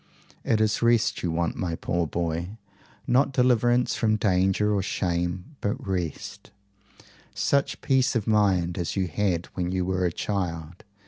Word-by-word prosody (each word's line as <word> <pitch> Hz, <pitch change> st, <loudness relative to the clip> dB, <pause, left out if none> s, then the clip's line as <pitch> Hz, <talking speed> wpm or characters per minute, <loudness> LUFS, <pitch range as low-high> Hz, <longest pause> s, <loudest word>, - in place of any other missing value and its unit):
It 110 Hz, -, +1 dB
is 110 Hz, -1 st, +1 dB
rest 115 Hz, -1 st, +2 dB
you 90 Hz, -, -1 dB
want, 85 Hz, +1 st, -1 dB
my 85 Hz, -3 st, -2 dB
poor 85 Hz, 0 st, -1 dB
boy 85 Hz, +5 st, -3 dB, 0.5 s
not 130 Hz, +3 st, +3 dB
deliverance 125 Hz, -1 st, +2 dB
from 110 Hz, -2 st, +2 dB
danger 95 Hz, 0 st, +2 dB
or 100 Hz, -, +1 dB
shame, 90 Hz, -, -2 dB
but 120 Hz, +6 st, -2 dB
rest 90 Hz, -5 st, -4 dB, 0.9 s
such 140 Hz, 0 st, 0 dB
peace 130 Hz, -1 st, +2 dB
of 110 Hz, -3 st, 0 dB
mind 95 Hz, -5 st, +2 dB
as 85 Hz, -, -2 dB
you 95 Hz, -2 st, 0 dB
had 90 Hz, -1 st, -1 dB
when 90 Hz, -1 st, -2 dB
you 90 Hz, -1 st, -1 dB
were 95 Hz, 0 st, -1 dB
a 90 Hz, -, +1 dB
child. 85 Hz, -3 st, -4 dB
95 Hz, 150 wpm, -26 LUFS, 85-110 Hz, 0.9 s, not